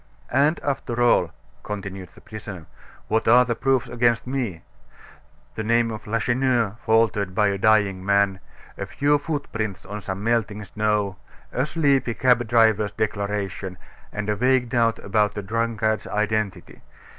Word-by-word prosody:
"And 150 +4 +3
after 125 -4 -2
all," 120 -1 +3 0.3
continued 95 -3 -6
the - - -16
prisoner, 105 -6 -9 0.4
"what 110 - 0
are 125 +2 +7
the 120 - 0
proofs 130 +2 +1
against 120 -1 +1
me? 125 -11 -3 0.9
The 110 - -4
name 115 +1 +2
of 110 -1 -8
Lacheneur 120 -1 +1
faltered 110 -4 +2
by 105 0 +3
a 100 -1 -2
dying 100 -3 +3
man; 100 -1 +2 0.4
a - - -3
few 145 +1 +2
footprints 125 - -4
on 105 0 -6
some 95 +1 -5
melting 110 -2 0
snow; 105 -2 -1 0.3
a 130 +3 -1
sleepy 140 -7 +1
cab 125 -2 +3
driver's 110 -2 +3
declaration; 100 -3 -3 0.3
and 105 -1 -4
a 105 - +1
vague 125 +1 +2
doubt 115 -2 +2
about 105 +1 0
a 105 - -3
drunkard's 110 +1 -1
identity. 105 -1 -2
110 Hz, 145 wpm, -23 LUFS, 100-120 Hz, 0.9 s, are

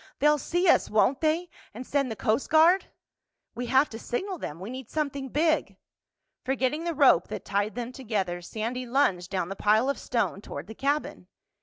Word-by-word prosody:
"They'll 300 +1 +3
see 350 +6 0
us, - - +4
won't 245 +7 +2
they? 325 +3 +1 0.3
And 250 +3 -7
send 275 -1 0
the 220 - -4
Coast 215 +5 0
Guard?" 335 +5 +5 0.7
"We 245 +1 -5
have 265 +4 +4
to 225 - -7
signal 370 - -4
them—we 185 - -6
need 260 -2 -8
something 280 -3 -3
big." 315 +4 +1 0.7
Forgetting 265 +4 -1
the 340 -2 -2
rope 270 - +5
that - - -6
tied 205 +2 -1
them 245 0 -4
together, 205 -9 -3
Sandy 230 +7 -4
lunged 195 -9 +1
down 185 -3 -2
the 195 - -4
pile 215 +6 +3
of - - -7
stone 230 -5 -1
toward 145 -6 -7
the 220 - -9
cabin. 285 +6 -2
255 Hz, 180 wpm, -27 LUFS, 215-295 Hz, 0.7 s, Guard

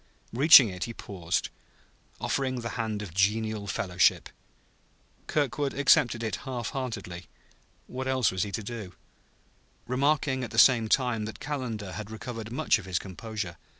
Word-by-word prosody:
Reaching 135 0 +8
it, 90 -2 -4
he 115 - -8
paused, 90 -5 -3 0.7
offering 130 -2 -1
the 115 - -4
hand 110 -3 -3
of 90 -6 -9
genial 105 +2 0
fellowship. 95 -4 +1 1.0
Kirkwood 145 -1 -1
accepted 120 -4 +3
it 110 - -2
half 125 -3 -5
heartedly 115 -9 -5 0.6
(what 130 +1 -5
else 130 -4 +2
was 95 0 -2
he 100 - -2
to 110 - -3
do?) 105 -4 -7 0.9
remarking 135 +1 +1
at 125 - -4
the 110 - -8
same 115 -2 +6
time 120 -4 +1
that 110 - -8
Calendar 120 -9 -4
had 105 +2 -7
recovered 115 0 -7
much 130 -3 +2
of 105 - -10
his 90 -2 -1
composure. 100 -1 -6
115 Hz, 150 wpm, -28 LUFS, 105-130 Hz, 1.0 s, Reaching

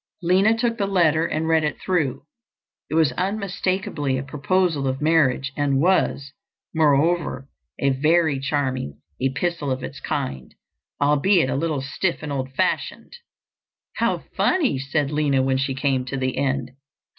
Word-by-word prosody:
Lina 195 +6 +3
took 230 0 -1
the 200 - +1
letter 165 -4 +3
and 160 +1 -2
read 160 -1 +3
it 150 - -2
through. 165 -9 -1 0.7
It - - -2
was 160 -5 +4
unmistakably 185 -5 -2
a 130 - -3
proposal 150 +1 0
of 130 0 -1
marriage 140 -4 +2
and 140 -2 +1
was, 145 -5 +1 0.4
moreover, 155 -1 +2 0.3
a 140 - +1
very 155 +1 +2
charming 130 - -2 0.2
epistle 145 +3 -1
of 130 0 -2
its - - -7
kind, 65 -2 -4 0.4
albeit 150 +2 +3
a - - -1
little 155 -1 -1
stiff 170 +6 -2
and 150 - -4
old 130 -1 -3
fashioned. 135 - -2 0.8
"How - - 0
funny!" 310 - +2
said 140 +1 -1
Lina 145 -3 +2
when 130 0 +1
she 135 0 -1
came 135 -1 0
to 135 +1 -4
the 130 -1 -1
end. 135 -2 -1
145 Hz, 145 wpm, -23 LUFS, 135-170 Hz, 0.8 s, was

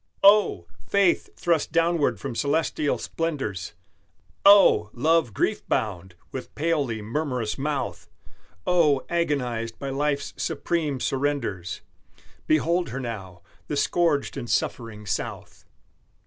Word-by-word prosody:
Oh! 200 - +5 0.2
faith, 200 -3 +3
thrust 170 -3 0
downward 165 -2 +2
from 135 -3 -5
celestial 145 +3 0
splendors, 135 - -3 0.7
Oh! 200 - +7
love 155 0 +2
grief - - 0
bound, 95 -4 -2 0.2
with 130 - -7
palely 145 -8 0
murmurous 125 -2 -2
mouth! 135 - -3 0.6
Oh! 150 -6 +3
agonized 125 -9 -1
by 140 -1 -4
life's 140 +1 -1
supreme 155 -6 -1
surrenders 125 -12 -2 0.7
Behold 170 +3 +2
her 135 - -4
now 95 -8 -7 0.2
the 150 - -2
scourged 155 -4 +1
and 120 -3 -5
suffering 110 -3 -2
South! 85 -4 -5
140 Hz, 105 wpm, -25 LUFS, 115-165 Hz, 0.7 s, Oh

